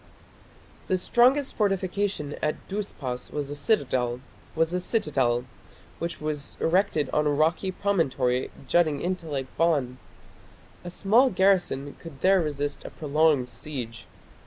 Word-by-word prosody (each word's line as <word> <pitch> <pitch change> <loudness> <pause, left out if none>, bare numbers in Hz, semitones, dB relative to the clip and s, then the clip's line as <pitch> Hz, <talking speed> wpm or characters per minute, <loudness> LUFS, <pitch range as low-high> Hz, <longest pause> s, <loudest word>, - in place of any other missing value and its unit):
The 185 - +2
strongest 255 +8 +3
fortification 195 -6 -1
at 150 - -2
Dhuspas 150 -11 -4
was 145 -2 -4
the 145 - -4
citadel, 130 - 0 1.8
which 170 0 -4
was 150 -2 -4
erected 165 -4 +2
on 150 0 +2
a - - +3
rocky 160 +6 +1
promontory 135 -11 0 0.2
jutting 155 -3 +3
into 175 -1 -3
Lake 135 -3 -2
Van. 140 -7 +1 0.8
A 175 - -6
small 220 +9 +4
garrison 180 - +1
could 155 -5 -11
there 190 0 +5
resist 145 -2 -3
a - - -7
prolonged 150 -3 +2
siege. 120 -4 -7
155 Hz, 115 wpm, -26 LUFS, 140-190 Hz, 1.8 s, there